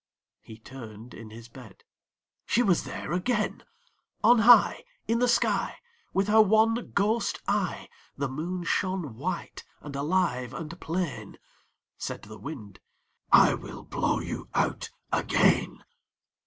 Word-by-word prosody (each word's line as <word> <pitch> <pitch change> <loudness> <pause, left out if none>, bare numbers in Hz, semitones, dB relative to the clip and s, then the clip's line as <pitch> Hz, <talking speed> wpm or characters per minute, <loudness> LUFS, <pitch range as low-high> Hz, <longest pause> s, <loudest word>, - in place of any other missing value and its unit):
He 110 - -13
turned 115 -1 -11
in 115 -1 -10
his 115 +1 -11
bed; 115 -5 -14 0.6
she 240 - +3
was 185 -7 +2
there - - -6
again! 210 +5 -1 0.6
On 235 +2 +6
high 240 +2 +6 0.2
In 230 +1 +1
the 245 - +3
sky 235 -1 +1 0.4
With 195 +1 +1
her 220 +1 +6
one 220 +2 +4 0.2
ghost 210 +2 +1
eye, 200 -3 -1 0.3
The 140 0 -1
Moon 170 +7 -4
shone 180 - -1
white - - -5 0.2
and 145 -1 -9
alive 140 -5 0
and 165 +2 -7
plain. 170 -2 -4 0.6
Said - - -5
the 110 0 -11
Wind 105 -6 -9 0.5
"I - - +7
will - - -8
blow - - -1
you - - -6
out - - 0 0.2
again." - - +2
170 Hz, 130 wpm, -27 LUFS, 125-210 Hz, 0.6 s, I